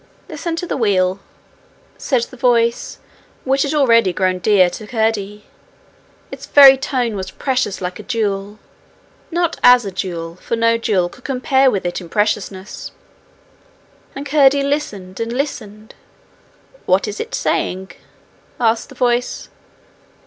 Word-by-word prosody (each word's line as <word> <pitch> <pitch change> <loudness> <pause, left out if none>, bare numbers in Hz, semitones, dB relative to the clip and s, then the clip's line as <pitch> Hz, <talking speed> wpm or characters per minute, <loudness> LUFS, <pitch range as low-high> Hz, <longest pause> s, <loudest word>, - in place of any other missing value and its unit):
'Listen 340 -2 -4
to 335 - -4
the - - -3
wheel,' 190 -5 +1 0.8
said 255 -5 0
the 255 - -9
voice 235 -2 +1 0.5
which 270 +1 +1
had 285 +2 0
already 230 -9 +4
grown 185 0 0
dear 195 -2 +4
to 210 +4 -7
Curdie: 210 -3 -2 0.9
its - - -9
very 275 -2 +8
tone 255 -4 -2
was 190 -1 -5
precious 250 -3 -2
like 180 0 -5
a - - -6
jewel, 205 -3 -3 0.7
not 340 -1 -1
as 245 -2 +6
a 195 - -4
jewel, 170 -2 -5
for 230 - -3
no 230 0 +2
jewel 205 -6 0
could 245 +8 -16
compare 265 0 +2
with 200 -7 -2
it 175 +2 -3
in 170 - -11
preciousness. 205 -1 -2 1.2
And 275 +1 -6
Curdie 280 -1 +4
listened 210 -11 -3
and 230 0 -3
listened. 220 -5 -5 0.9
'What - - +2
is 425 - -6
it 460 +2 -4
saying?' 190 +1 -2 0.7
asked 230 +1 +1
the 270 - -13
voice. 245 0 -1
230 Hz, 140 wpm, -18 LUFS, 195-265 Hz, 1.2 s, very